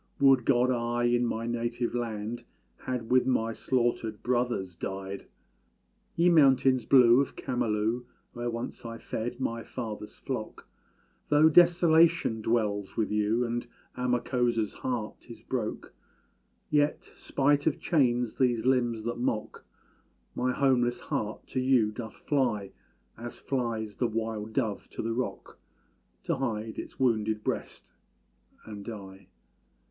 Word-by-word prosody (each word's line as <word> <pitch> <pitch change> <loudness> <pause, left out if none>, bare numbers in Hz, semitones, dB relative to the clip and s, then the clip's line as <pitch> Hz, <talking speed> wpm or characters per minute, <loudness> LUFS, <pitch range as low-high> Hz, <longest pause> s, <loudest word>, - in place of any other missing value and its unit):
Would 135 -3 +5
God 125 -1 +3
I 120 0 -1
in 120 0 +2
my 115 0 -2
native 120 0 -2
land 115 -1 -3 0.4
Had 125 -3 -3
with 130 0 +4
my 115 -3 +1
slaughtered 120 -3 -1
brothers 120 -7 -1
died! 95 +2 -6 0.9
Ye 170 +1 +3
mountains 135 -6 +4
blue 125 -1 +7
of 140 - -4
Camalú, 115 -1 -1 0.3
Where 120 0 -3
once 115 +1 -5
I 115 -1 -6
fed 120 +2 -4
my 115 -3 -2
father's 110 -4 -7
flock, - - -6 0.6
Though 150 +2 +6
desolation 170 -6 +5
dwells 105 -3 -1
with 110 -2 0
you, 105 +3 +1
And 120 0 -3 0.3
Amakósa's 120 -2 0
heart 120 -5 -4
is - - -10
broke, - - -4 0.8
Yet, 150 0 +1
spite 145 +2 +1
of 150 - +1
chains 125 -7 +1
these 120 -3 +2
limbs 120 -4 +2
that 120 +1 -3
mock, 110 -3 -2 0.7
My 125 +1 0
homeless 125 -2 +2
heart 105 0 -4
to 130 - -1
you 130 -4 +3
doth 110 0 -7
fly, 120 -9 -1 0.5
As 120 +1 -7
flies 115 -5 -2
the 120 - +1
wild 110 -1 -3
dove 110 -5 -2
to - - -4
the 115 +1 -1
rock, 125 +2 -4 0.6
To - - -1
hide 110 -4 -3
its - - -8
wounded 110 -4 +1
breast - - -4 0.7
and 105 -2 -8
die! 100 -3 -9
120 Hz, 130 wpm, -29 LUFS, 110-130 Hz, 0.9 s, blue